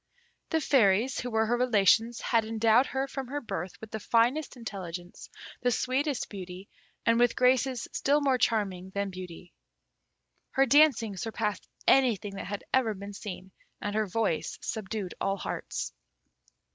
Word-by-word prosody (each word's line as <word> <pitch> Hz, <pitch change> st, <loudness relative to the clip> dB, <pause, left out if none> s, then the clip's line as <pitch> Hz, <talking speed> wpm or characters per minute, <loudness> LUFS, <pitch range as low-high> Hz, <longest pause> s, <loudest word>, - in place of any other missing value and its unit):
The 320 Hz, -, +2 dB
Fairies, 240 Hz, -4 st, +3 dB
who 245 Hz, -, -3 dB
were 220 Hz, -1 st, +2 dB
her 235 Hz, +2 st, +1 dB
relations, 230 Hz, -1 st, +3 dB
had 230 Hz, -1 st, +2 dB
endowed 225 Hz, +3 st, +3 dB
her 270 Hz, +1 st, -2 dB
from 270 Hz, -1 st, -5 dB
her 285 Hz, +3 st, -3 dB
birth 185 Hz, -, -5 dB
with 220 Hz, -1 st, -10 dB
the 220 Hz, -, -4 dB
finest 240 Hz, +7 st, +1 dB
intelligence, 180 Hz, -6 st, -7 dB, 0.3 s
the 245 Hz, -, +2 dB
sweetest 260 Hz, +3 st, 0 dB
beauty, 185 Hz, -1 st, -8 dB, 0.4 s
and 230 Hz, 0 st, +4 dB
with 245 Hz, -1 st, +3 dB
graces 255 Hz, 0 st, +2 dB
still 285 Hz, +2 st, +2 dB
more 270 Hz, -3 st, +2 dB
charming 195 Hz, -6 st, 0 dB
than 200 Hz, -1 st, -1 dB
beauty. 180 Hz, -1 st, -9 dB, 1.0 s
Her 270 Hz, -, +4 dB
dancing 255 Hz, -7 st, +4 dB
surpassed 215 Hz, -1 st, -3 dB, 0.2 s
anything 225 Hz, -7 st, +3 dB
that -, -, -5 dB
had 205 Hz, 0 st, -5 dB
ever 235 Hz, -5 st, +2 dB
been 200 Hz, +1 st, -8 dB
seen, 190 Hz, -2 st, -8 dB, 0.3 s
and 205 Hz, -, -3 dB
her 215 Hz, 0 st, 0 dB
voice 195 Hz, -4 st, -1 dB
subdued 210 Hz, -3 st, -4 dB
all 195 Hz, 0 st, 0 dB
hearts. -, -, -4 dB
225 Hz, 150 wpm, -29 LUFS, 195-255 Hz, 1.0 s, and